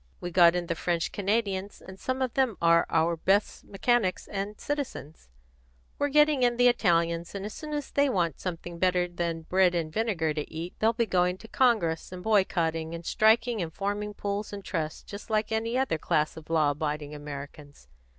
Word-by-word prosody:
We 175 Hz, -, -5 dB
got 170 Hz, -1 st, +6 dB
in 175 Hz, -1 st, -1 dB
the 170 Hz, -, -1 dB
French 170 Hz, 0 st, -1 dB
Canadians, 200 Hz, -1 st, -1 dB
and 190 Hz, 0 st, -12 dB
some 260 Hz, 0 st, -1 dB
of 255 Hz, -, -2 dB
them 260 Hz, -6 st, +1 dB
are 170 Hz, 0 st, +4 dB
our 165 Hz, +1 st, +2 dB
best 195 Hz, +5 st, +1 dB
mechanics 200 Hz, -2 st, 0 dB
and 200 Hz, +1 st, -5 dB
citizens. 250 Hz, -, -5 dB, 0.7 s
We're 285 Hz, -, +2 dB
getting 300 Hz, -1 st, +4 dB
in 240 Hz, -1 st, +3 dB
the 245 Hz, 0 st, +5 dB
Italians, 170 Hz, -6 st, +1 dB
and 200 Hz, 0 st, -4 dB
as 210 Hz, -, -6 dB
soon 305 Hz, -1 st, -8 dB
as 295 Hz, -1 st, -4 dB
they 285 Hz, 0 st, +3 dB
want 170 Hz, -, 0 dB
something 175 Hz, -1 st, -6 dB
better 180 Hz, -1 st, +2 dB
than 170 Hz, -2 st, -3 dB
bread 180 Hz, +1 st, +3 dB
and 160 Hz, -2 st, -2 dB
vinegar 185 Hz, -8 st, 0 dB
to 150 Hz, -1 st, -5 dB
eat, 165 Hz, +3 st, -6 dB
they'll 220 Hz, +1 st, +4 dB
begin 225 Hz, -3 st, -1 dB
going 180 Hz, 0 st, +2 dB
to 225 Hz, -, -13 dB
Congress 220 Hz, -13 st, +1 dB
and 180 Hz, -1 st, -8 dB
boycotting 170 Hz, -6 st, +1 dB
and 170 Hz, 0 st, -9 dB
striking 225 Hz, +2 st, +3 dB
and 165 Hz, -2 st, -3 dB
forming 205 Hz, +3 st, -3 dB
pools 205 Hz, +1 st, -3 dB
and 200 Hz, -1 st, -8 dB
trusts 160 Hz, -4 st, -3 dB
just 200 Hz, +3 st, -10 dB
like 215 Hz, 0 st, 0 dB
any 225 Hz, +2 st, 0 dB
other 260 Hz, -12 st, 0 dB
class 155 Hz, -2 st, 0 dB
of 160 Hz, -1 st, -12 dB
law 155 Hz, -3 st, +3 dB
abiding 150 Hz, 0 st, -3 dB
Americans. 145 Hz, -, -9 dB
185 Hz, 190 wpm, -28 LUFS, 165-220 Hz, 0.7 s, got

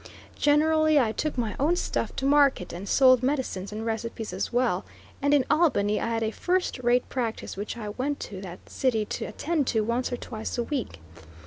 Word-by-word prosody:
Generally 310 Hz, +1 st, +4 dB
I 230 Hz, -5 st, +2 dB
took 300 Hz, +4 st, -3 dB
my 230 Hz, -4 st, -1 dB
own 310 Hz, +6 st, +3 dB
stuff -, -, -2 dB
to 270 Hz, -, -2 dB
market, 280 Hz, -9 st, +3 dB
and 185 Hz, +3 st, -6 dB
sold 255 Hz, -2 st, +6 dB
medicines 255 Hz, -8 st, -2 dB
and 215 Hz, +1 st, -5 dB
recipes 225 Hz, -2 st, -4 dB
as 190 Hz, -, -3 dB
well, 240 Hz, -6 st, +1 dB, 0.4 s
and 285 Hz, +1 st, +2 dB
in 285 Hz, -3 st, +4 dB
Albany 215 Hz, -11 st, +2 dB
I -, -, -1 dB
had 230 Hz, -1 st, -1 dB
a 220 Hz, -, 0 dB
first 360 Hz, +1 st, -1 dB
rate 245 Hz, 0 st, +2 dB
practice 235 Hz, -4 st, -3 dB
which 205 Hz, +4 st, -5 dB
I 215 Hz, -3 st, -5 dB
went 265 Hz, +7 st, -2 dB
to 190 Hz, -3 st, -6 dB
that 180 Hz, -2 st, -10 dB
city 225 Hz, -5 st, 0 dB
to -, -, -4 dB
attend 295 Hz, +5 st, -1 dB
to 220 Hz, -, +2 dB
once 235 Hz, +4 st, -1 dB
or 245 Hz, -, -2 dB
twice 220 Hz, -1 st, -5 dB
a 240 Hz, -, +1 dB
week. 235 Hz, -, -4 dB
245 Hz, 200 wpm, -26 LUFS, 215-285 Hz, 0.4 s, sold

